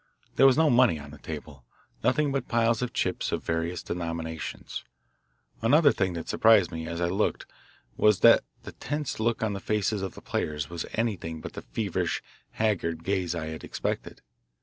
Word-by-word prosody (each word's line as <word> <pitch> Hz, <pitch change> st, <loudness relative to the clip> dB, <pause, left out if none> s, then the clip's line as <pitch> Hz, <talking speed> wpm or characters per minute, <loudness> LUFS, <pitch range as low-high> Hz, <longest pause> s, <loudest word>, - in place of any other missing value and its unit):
There 135 Hz, -, +7 dB
was 135 Hz, -, +4 dB
no 160 Hz, -2 st, +5 dB
money 120 Hz, -8 st, +5 dB
on 70 Hz, -1 st, -10 dB
the 75 Hz, -, -12 dB
table, 75 Hz, -4 st, -8 dB, 0.4 s
nothing 145 Hz, +2 st, +2 dB
but 135 Hz, -2 st, -2 dB
piles 115 Hz, 0 st, +2 dB
of 125 Hz, -, -2 dB
chips -, -, -1 dB
of -, -, -2 dB
various 80 Hz, +2 st, -2 dB
denominations. 85 Hz, -2 st, -5 dB, 0.8 s
Another 145 Hz, +6 st, +5 dB
thing 95 Hz, -2 st, 0 dB
that 85 Hz, -1 st, -5 dB
surprised 110 Hz, -6 st, +5 dB
me 80 Hz, 0 st, -5 dB
as 85 Hz, 0 st, -4 dB
I 85 Hz, -, +1 dB
looked 95 Hz, +4 st, 0 dB, 0.5 s
was 105 Hz, -3 st, +4 dB
that -, -, +7 dB, 0.2 s
the -, -, -8 dB
tense 150 Hz, -3 st, -4 dB
look 115 Hz, 0 st, 0 dB
on 110 Hz, -2 st, 0 dB
the 100 Hz, -, -4 dB
faces 105 Hz, 0 st, 0 dB
of 95 Hz, -, -4 dB
the -, -, -10 dB
players 75 Hz, 0 st, -2 dB
was 85 Hz, -1 st, -4 dB
anything 100 Hz, -8 st, -2 dB
but -, -, -8 dB
the -, -, -6 dB
feverish, 90 Hz, -, -2 dB, 0.3 s
haggard 85 Hz, -7 st, 0 dB
gaze 90 Hz, -3 st, -1 dB
I 80 Hz, -2 st, -3 dB
had 80 Hz, 0 st, -7 dB
expected. -, -, -4 dB
95 Hz, 180 wpm, -27 LUFS, 80-115 Hz, 0.8 s, There